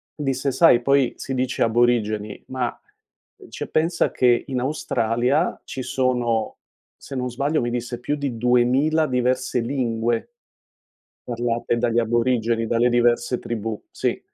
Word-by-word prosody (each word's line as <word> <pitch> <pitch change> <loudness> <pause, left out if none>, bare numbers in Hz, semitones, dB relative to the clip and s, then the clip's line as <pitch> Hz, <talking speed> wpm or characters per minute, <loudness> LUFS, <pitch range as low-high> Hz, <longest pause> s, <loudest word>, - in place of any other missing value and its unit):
disse: 135 -2 -1
"Sai, 125 -4 +5
poi 140 -1 +2
si 135 - -5
dice 125 -1 0
aborigeni 110 -3 +1
ma 130 -2 -3 0.7
cioè, - - -6
pensa 165 +2 +1
che 120 -1 +3
in 130 -2 -2
Australia 130 +1 0
ci 130 - -6
sono" 125 -4 0 0.4
se 135 - -8
non 125 -1 -2
sbaglio, 140 +4 0
mi 120 0 -2
disse: 120 0 -4
"Più 145 - -2
di 140 -5 -3
2000 125 +6 +2
diverse 125 0 0
lingue" 115 -2 -1 1.0
"parlate 120 -1 -1
dagli 120 0 +1
aborigeni, 115 0 +1
dalle 120 +2 +2
diverse 120 +1 +2
tribù," 110 -2 -4
sì. - - -1
125 Hz, 130 wpm, -22 LUFS, 120-130 Hz, 1.0 s, Sai